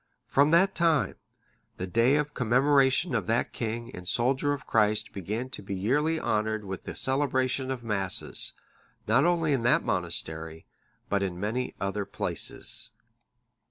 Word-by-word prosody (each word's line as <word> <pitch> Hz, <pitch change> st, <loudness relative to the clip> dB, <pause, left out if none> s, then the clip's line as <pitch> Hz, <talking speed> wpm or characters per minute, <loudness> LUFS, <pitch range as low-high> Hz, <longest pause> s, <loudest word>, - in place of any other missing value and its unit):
From 140 Hz, +2 st, +3 dB
that 175 Hz, +4 st, +4 dB
time, 165 Hz, -4 st, +2 dB, 0.6 s
the 90 Hz, -, -3 dB
day 115 Hz, +8 st, +3 dB
of 150 Hz, 0 st, -1 dB
commemoration 135 Hz, +5 st, +3 dB
of 105 Hz, -7 st, -1 dB
that 115 Hz, +2 st, 0 dB
king 115 Hz, +1 st, -4 dB
and 90 Hz, 0 st, -9 dB
soldier 130 Hz, +7 st, +1 dB
of 145 Hz, -, -4 dB
Christ 105 Hz, -1 st, +1 dB
began 110 Hz, +7 st, -4 dB
to -, -, -4 dB
be 100 Hz, 0 st, -5 dB
yearly 145 Hz, +12 st, +1 dB
honoured 110 Hz, -3 st, -1 dB
with 95 Hz, -1 st, -6 dB
the -, -, -6 dB
celebration 130 Hz, -1 st, 0 dB
of 130 Hz, -3 st, -4 dB
Masses, 100 Hz, -4 st, 0 dB, 0.5 s
not 125 Hz, +7 st, +3 dB
only 165 Hz, -4 st, +2 dB
in 135 Hz, -, +1 dB
that 125 Hz, +8 st, +3 dB
monastery, 80 Hz, -2 st, -2 dB, 0.4 s
but 100 Hz, 0 st, 0 dB
in 90 Hz, -3 st, -3 dB
many 115 Hz, +6 st, -2 dB
other 100 Hz, +1 st, -2 dB
places. -, -, -1 dB
120 Hz, 150 wpm, -28 LUFS, 100-140 Hz, 0.6 s, that